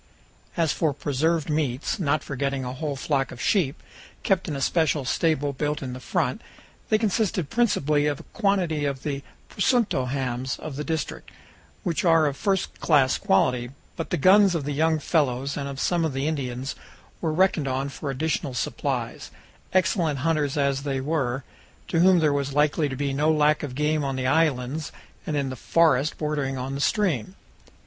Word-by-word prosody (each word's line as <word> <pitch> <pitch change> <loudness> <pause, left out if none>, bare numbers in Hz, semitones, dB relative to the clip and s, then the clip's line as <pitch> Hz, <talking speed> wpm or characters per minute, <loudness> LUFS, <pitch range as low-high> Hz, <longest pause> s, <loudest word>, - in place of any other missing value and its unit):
As 165 -3 +2
for 155 -4 0
preserved 145 +3 0
meats, 150 - -1
not 155 -3 +1
forgetting 140 -1 -2
a 125 - -4
whole 145 +1 -3
flock 135 -2 -1
of 125 - -10
sheep, 160 -7 +1 0.4
kept 190 -2 +1
in 150 - -3
a - - -3
special 155 -3 +1
stable 145 0 +1
built 150 +2 -2
in 130 -2 -5
the 125 - -7
front, 125 - -1 0.5
they 215 - +4
consisted 210 -6 0
principally 150 -11 +2
of 145 -2 -1
a - - -10
quantity 185 -8 +1
of 140 -2 -3
the 140 -2 -3 0.3
"presunto" 205 - +1
hams 130 -1 -2
of 155 -3 -7
the 150 - -3
district, 160 0 -4 0.5
which 165 -4 -1
are 165 -3 +5
of 145 -2 0
first 195 +4 -1
class 140 -5 +3
quality; 120 +5 +2 0.3
but 165 - -4
the - - 0
guns 190 +4 +5
of 160 - -1
the 145 - -3
young 160 +2 +2
fellows 140 -3 0
and 140 -1 -3
of 135 -1 -6
some 175 +2 +1
of 160 -4 -1
the 135 +2 -1
Indians 135 -3 -3 0.5
were 160 - 0
reckoned 165 -3 +2
on 135 +1 -1
for 140 +1 -6
additional 140 -1 -2
supplies, - - -3 0.4
excellent 175 -5 +2
hunters 150 -3 +1
as 140 -1 +1
they 140 -2 -2
were, 135 -3 -1 0.4
to 165 - 0
whom 185 +1 +6
there 155 -3 +3
was 140 -1 -1
likely 150 0 +2
to 135 - -4
be 140 +1 -1
no 150 +3 +2
lack 150 0 +3
of 135 -4 -5
game 150 +1 +1
on 135 -1 -2
the 130 -1 -2
islands 145 0 +1 0.4
and 150 - -1
in 135 -2 -1
the - - -5
forests 155 +1 +2
bordering 145 -3 -2
on 130 +2 -4
the 140 - -3
stream. 185 - 0
145 Hz, 185 wpm, -25 LUFS, 135-160 Hz, 0.5 s, whom